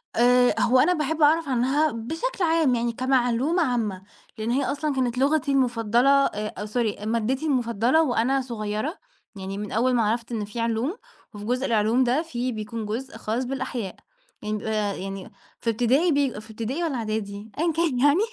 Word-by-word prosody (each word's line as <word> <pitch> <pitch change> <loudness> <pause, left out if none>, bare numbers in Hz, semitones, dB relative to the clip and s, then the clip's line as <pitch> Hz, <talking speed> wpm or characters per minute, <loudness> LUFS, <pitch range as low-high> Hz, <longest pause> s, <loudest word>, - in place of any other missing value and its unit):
آآ 245 +1 +4
هو 255 +2 +4
أنا 345 +7 +4
باحب 315 0 -2
أعرف 310 0 +4
عنها 265 +5 +2
بشكل 325 - -3
عام 320 -6 +3
يعني 235 0 0
كمعلومة 260 +6 +1
عامة 225 -8 -1 0.4
لإن 220 +2 -2
هي 270 +3 +1
أصلًا 290 0 -1
كانت 250 -2 0
لغتي 280 +1 +2
المفضلة 245 -1 +2 0.2
آآ 210 +1 -3
آآ 210 - -4
sorry 215 -2 -2
مادتي 230 +6 -1
المفضّلة 245 0 +2
وأنا 265 0 +1
صغيّرة، 230 - -3 0.4
يعني 195 0 -6
من 210 0 -5
أول 250 +3 +2
ما 235 -2 +3
عرفت 230 +3 -1
إن 215 -3 -2
في 210 +3 -7
علوم 230 - -1 0.4
وفي 205 0 -8
جزء 250 +4 0
العلوم 225 +2 +2
ده 255 +5 +2
في 255 -6 -3
بيكون 220 0 -5
جزء 235 +6 -5
خاص 230 +4 -2
بالأحياء، 245 -6 -4 0.5
يعني 215 0 -2
بيبقى 210 -2 -2
يعني 195 0 -6 0.3
في 230 - -2
ابتدائي، 250 +9 +2
بيبقى 280 -7 0
في 215 +1 -13
ابتدائي 235 +9 -3
والّا 320 -5 -1
إعدادي؟ 215 -2 -4
أيًا 335 0 +2
كان 315 -6 0
يعني، 290 +5 +4
245 Hz, 175 wpm, -25 LUFS, 220-275 Hz, 0.5 s, آآ